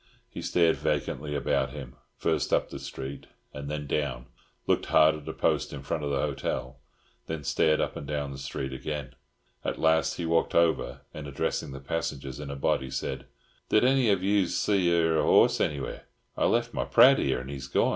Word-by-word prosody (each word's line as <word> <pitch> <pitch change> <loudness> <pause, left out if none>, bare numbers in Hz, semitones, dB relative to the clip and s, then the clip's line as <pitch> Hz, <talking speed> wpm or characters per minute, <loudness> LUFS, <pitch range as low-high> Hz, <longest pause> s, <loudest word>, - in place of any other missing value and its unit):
He - - -8
stared 85 -2 +2
vacantly 75 -1 -2
about 70 - 0
him, 70 -3 -8 0.2
first - - 0
up - - +1
the - - -6
street 70 0 -7 0.3
and 70 -1 -6
then 75 -1 -3
down, 70 -4 -2 0.4
looked - - +1
hard 80 0 +5
at 75 -1 -9
a - - -4
post - - 0
in 70 -1 -7
front 75 +1 -3
of 70 - -1
the 70 -1 0
hotel, 70 -3 -3 0.5
then 80 -2 -4
stared 75 +3 +2
up - - -1
and 70 - -7
down 70 -2 -2
the 70 - -8
street 65 0 -4
again. 75 0 -5 0.5
At - - -2
last 80 0 +2
he 85 - -4
walked 80 0 +1
over, 85 -1 +2
and, 75 -1 -7
addressing 70 0 -2
the 70 - -7
passengers 70 -2 -4
in 75 -1 -6
a 70 - -4
body, 65 -1 0
said, 65 0 -4 0.4
"Did 110 - +4
any 130 -2 +4
of 100 -2 +2
you's 100 -2 +2
see 95 -4 +2
e'er 80 -2 +3
a - - +2
horse - - +5
anywheres? 70 -2 -2 0.3
I - - +1
left - - +1
my 60 - -1
prad - - +7
here, 65 - +1
and 65 +3 -7
he's 70 -1 -6
gorn." - - +2
75 Hz, 200 wpm, -28 LUFS, 70-80 Hz, 0.5 s, prad